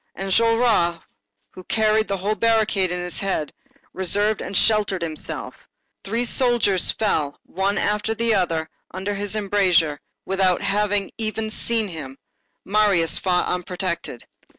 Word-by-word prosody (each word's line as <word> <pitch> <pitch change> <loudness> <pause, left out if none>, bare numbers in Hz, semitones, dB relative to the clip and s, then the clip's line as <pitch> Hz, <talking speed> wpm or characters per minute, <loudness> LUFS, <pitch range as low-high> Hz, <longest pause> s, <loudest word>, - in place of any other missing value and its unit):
Enjolras, 215 -3 +2 0.5
who 185 - -11
carried 220 0 +2
the 195 - -1
whole 200 +3 -1
barricade 215 -5 +1
in 180 - -2
his 180 0 -4
head, 190 -6 -2 0.4
reserved 205 +3 +1
and 195 - -2
sheltered 205 -5 +2
himself; 155 -2 -4 0.5
three 230 +5 -1
soldiers 235 -7 +2
fell, 155 -9 0
one 195 +2 -1
after 210 +2 0
the 230 0 +1
other, 165 -5 0 0.2
under 190 +3 -4
his 205 +1 -3
embrasure, 185 -8 +2 0.3
without 190 -1 +1
having 205 0 0
even 220 0 -2
seen 225 -1 -1
him; 145 -7 -8 0.5
Marius 195 -5 +2
fought 180 -1 +1
unprotected. 180 -6 -4
195 Hz, 130 wpm, -22 LUFS, 180-215 Hz, 0.5 s, Enjolras